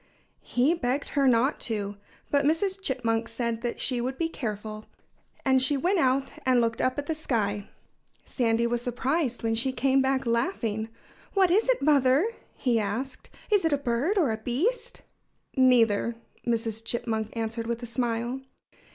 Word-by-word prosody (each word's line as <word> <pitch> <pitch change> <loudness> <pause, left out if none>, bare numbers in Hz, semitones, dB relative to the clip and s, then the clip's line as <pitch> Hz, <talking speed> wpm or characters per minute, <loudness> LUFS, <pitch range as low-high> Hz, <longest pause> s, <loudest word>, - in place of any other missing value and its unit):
He 255 +7 +3
begged 275 -4 -1
her 280 -2 +2
not 250 +3 +3
to. 205 -3 -3 0.4
But 285 0 +3
Mrs. 375 +6 +1
Chipmunk 230 -7 0
said 230 -1 -3 0.2
she 250 -3 0
would 260 +2 -3
be 330 -1 0
careful. 215 -5 -5 0.6
And 265 -1 +4
she 275 +2 +3
went 360 +7 +1
out 270 -1 +1
and 255 -2 +4
looked 230 -1 0
up 255 +2 +1
at 290 - -2
the 320 - -1
sky. 210 -9 -2 0.6
Sandy 230 -2 +1
was 235 0 0
surprised 255 +2 -1
when 225 0 +1
she 240 +4 +1
came 270 +1 +2
back 265 0 +1
laughing. 230 - -1 0.5
"What 380 -3 +4
is 430 +7 +3
it, - - +2
Mother?" 280 +2 +4 0.3
he 240 -4 +1
asked. 225 +6 -4 0.2
"Is 410 -3 +4
it 325 -2 +2
a - - +3
bird 275 - 0
or 305 -11 +3
a 220 - -2
beast?" 280 - -2 0.5
"Neither!" 235 -4 +4 0.3
Mrs. 225 -1 -1
Chipmunk 225 -2 -2
answered 225 0 -3
with 235 +1 -3
a - - -2
smile. 240 +1 -2
250 Hz, 160 wpm, -27 LUFS, 230-280 Hz, 0.6 s, And